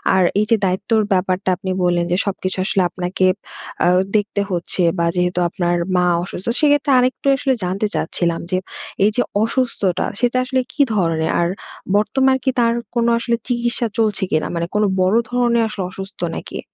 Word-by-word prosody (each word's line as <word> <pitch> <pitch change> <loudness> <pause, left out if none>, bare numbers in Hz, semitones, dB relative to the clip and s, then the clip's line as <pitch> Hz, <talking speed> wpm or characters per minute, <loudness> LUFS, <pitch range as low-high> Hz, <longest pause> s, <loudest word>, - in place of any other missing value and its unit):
আর 185 - +4 0.2
এই 210 - +2
যে 230 - +5
দায়িত্বর 190 +4 +1
ব্যাপারটা 185 0 0
আপনি 190 0 -4
বললেন, 175 -1 +2
যে 180 - +2
সবকিছু 190 -1 -3
আসলে 195 -1 +1
আপনাকে 180 +1 -1 0.6
অ্যা - - +4 0.3
দেখতে 205 -1 -1
হচ্ছে, 180 0 -1 0.2
বা 170 - +2
যেহেতু 180 0 0
আপনার 175 0 0 0.2
মা 180 - +3 0.2
অসুস্থ, 185 0 -7
সেক্ষেত্রে 290 -1 +3
আরেকটু 255 +2 0
আসলে 270 -1 +1
জানতে 190 +4 -1
চাচ্ছিলাম, 170 -1 -1
যে 185 - +2 0.5
এই - - +5
যে 245 - +2 0.2
অসুস্থতা 225 -6 0
সেটা 245 +1 +1
আসলে 260 0 0
কি 295 - -1
ধরনের? 165 -4 +1
আর 170 - +2 0.5
বর্তমান 265 +6 +2
কি 265 - +2
তার 230 0 +3 0.2
কোন 235 -1 +2
আসলে 235 0 0
চিকিৎসা 240 -1 0
চলছে 215 -3 +1
কিনা? 155 - +1
মানে 170 - -1
কোন 210 - +3 0.2
বড় 185 +5 +3
ধরনের 240 -1 +2
আসলে 205 -3 -4
অসুস্থ 195 +2 -9 0.2
নাকি? - - -6
200 Hz, 170 wpm, -19 LUFS, 180-235 Hz, 0.6 s, যে